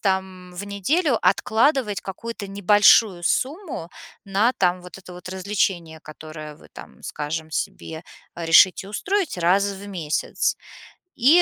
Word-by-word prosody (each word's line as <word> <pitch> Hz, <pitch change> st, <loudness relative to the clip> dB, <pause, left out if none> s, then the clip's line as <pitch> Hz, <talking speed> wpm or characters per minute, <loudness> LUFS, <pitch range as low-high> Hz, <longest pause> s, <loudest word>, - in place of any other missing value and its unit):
там, 190 Hz, -2 st, -2 dB
в 195 Hz, +3 st, -6 dB
неделю 235 Hz, -, 0 dB
откладывать 220 Hz, -, +2 dB
какую-то 205 Hz, +2 st, -7 dB
небольшую 200 Hz, -1 st, +4 dB
сумму 280 Hz, -, -2 dB, 0.4 s
на, 200 Hz, +5 st, +2 dB
там, 180 Hz, -3 st, +1 dB
вот 180 Hz, +1 st, -11 dB
это 185 Hz, -1 st, -12 dB
вот 180 Hz, +1 st, -10 dB
развлечение, 185 Hz, -4 st, -2 dB
которое 155 Hz, 0 st, -10 dB
вы -, -, -18 dB
там, -, -, -13 dB
скажем, 155 Hz, +1 st, -5 dB
себе 160 Hz, +1 st, -4 dB, 0.3 s
решите 170 Hz, +3 st, +5 dB
устроить 385 Hz, -, -1 dB
раз 180 Hz, +4 st, +3 dB
в 200 Hz, 0 st, -5 dB
месяц. 165 Hz, -6 st, -1 dB, 0.6 s
И, 295 Hz, +9 st, +6 dB
190 Hz, 125 wpm, -23 LUFS, 175-210 Hz, 0.6 s, И